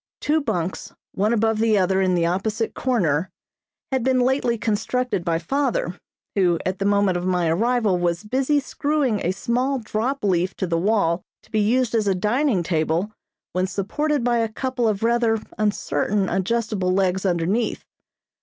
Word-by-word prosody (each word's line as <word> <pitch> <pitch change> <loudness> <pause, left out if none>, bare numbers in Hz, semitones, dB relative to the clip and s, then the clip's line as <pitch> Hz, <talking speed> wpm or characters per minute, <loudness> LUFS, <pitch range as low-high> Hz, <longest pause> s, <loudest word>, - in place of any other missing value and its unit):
Two 310 +1 +1
bunks, 190 - -3 0.2
one 210 +3 0
above 225 -1 +1
the 220 -1 +3
other 190 0 +2
in 185 -1 +2
the 170 -1 +2
opposite 215 +6 -1
corner, 185 - 0 0.6
had 260 -2 0
been 260 0 +2
lately 250 -2 +1
constructed 220 -1 -1
by 165 -1 +1
father, 235 -1 -1 0.4
who 180 -4 +2
at 185 +1 -2
the 195 - -1
moment 200 -2 +2
of 175 +1 -3
my 180 -2 +1
arrival 215 +2 +1
was 175 +2 0
busy 265 +6 +1
screwing 280 -5 0
a 170 - 0
small 250 +7 0
drop 240 +3 -2
leaf 185 -1 +1
to - - -2
the 170 -2 -1
wall 185 -3 +1 0.2
to - - -25
be 215 - +1
used 235 +3 +2
as 220 -3 +1
a 195 - +2
dining 215 +1 +1
table 165 +4 0 0.4
when 185 +1 0
supported 245 +10 -1
by 240 -1 +2
a 225 -1 0
couple 250 +1 -1
of 210 -1 -1
rather 230 -1 +2 0.2
uncertain 210 -1 0
adjustable 195 0 0
legs 190 0 +1
underneath. 190 +5 0
210 Hz, 165 wpm, -23 LUFS, 185-240 Hz, 0.6 s, the